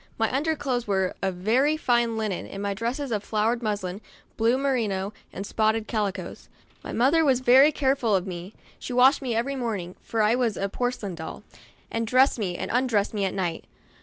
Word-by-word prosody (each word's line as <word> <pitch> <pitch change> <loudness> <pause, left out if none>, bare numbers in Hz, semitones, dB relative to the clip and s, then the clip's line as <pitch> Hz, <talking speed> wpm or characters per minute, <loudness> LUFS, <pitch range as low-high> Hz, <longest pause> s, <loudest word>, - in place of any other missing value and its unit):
My 225 +3 0
under 315 +3 +1
clothes 250 -5 -2
were 190 -2 0
of 190 -2 -1
very 250 +11 +2
fine 240 -5 +1
linen, 215 -4 -2
and 195 - -7
my 200 0 -1
dresses 240 +6 -3
of 210 -2 -1
flowered 225 +3 0
muslin, 205 -3 -3 0.3
blue 230 +3 +2
merino, 220 -8 -1 0.2
and 195 - -6
spotted 220 +1 +1
calicoes. 205 -4 -3 0.3
My - - -6
mother 280 +7 +3
was 265 -4 +3
very 260 +4 +7
careful 265 -7 +1
of 185 -1 0
me; 180 +1 -7 0.2
she 250 - -6
washed 260 +4 +5
me 250 -4 -2
every 260 +5 -1
morning 210 -8 -3
(for 225 -1 -1
I 210 +2 +4
was 240 -4 0
a 195 - -1
porcelain 245 -4 -3
Doll), 160 -1 -8 0.5
and 230 0 -2
dressed 255 +2 +4
me, 180 -4 -2
and - - -4
undressed 235 -5 +1
me 205 -2 0
at 190 - -2
night. 175 -4 -2
225 Hz, 195 wpm, -25 LUFS, 200-255 Hz, 0.5 s, very